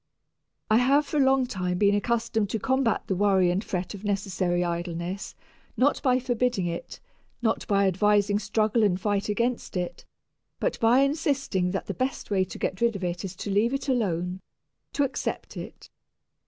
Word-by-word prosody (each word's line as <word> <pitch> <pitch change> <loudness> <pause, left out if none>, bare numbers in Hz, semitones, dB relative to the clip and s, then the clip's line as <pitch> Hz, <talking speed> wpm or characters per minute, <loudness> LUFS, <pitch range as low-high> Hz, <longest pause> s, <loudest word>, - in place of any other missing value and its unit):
I 215 - +6
have 275 +5 +4
for 300 - -3
a 280 - +5
long 265 -1 +3
time 180 -7 -2
been 200 +1 +4
accustomed 225 0 0
to 220 - -2
combat 260 -1 +1
the 190 - -1
worry 190 -2 +3
and 185 +4 -1
fret 185 -1 -3
of 200 0 -9
necessary 190 -3 0
idleness 170 +2 -4 0.4
not 280 +3 +2
by 255 -3 +3
forbidding 245 -5 0
it, 170 0 -5 0.4
not 220 -1 0
by 200 -1 +3
advising 205 +2 +3
struggle 215 +2 +1
and 190 -4 +2
fight 205 0 -1
against 235 -1 -1
it, 180 -1 -4 0.6
but - - -1
by 235 +4 +5
insisting 275 - 0
that 195 +1 -3
the - - -4
best 260 -4 -3
way 190 -2 +3
to - - -9
get 185 - -3
rid 235 -2 +2
of 195 - -5
it 175 +1 -2
is 190 -1 -5
to 200 - -5
leave 225 +6 +2
it 275 - -4
alone, 185 -7 -1 0.5
to 285 - +2
accept 275 - -3
it. - - -9
205 Hz, 180 wpm, -26 LUFS, 185-245 Hz, 0.6 s, I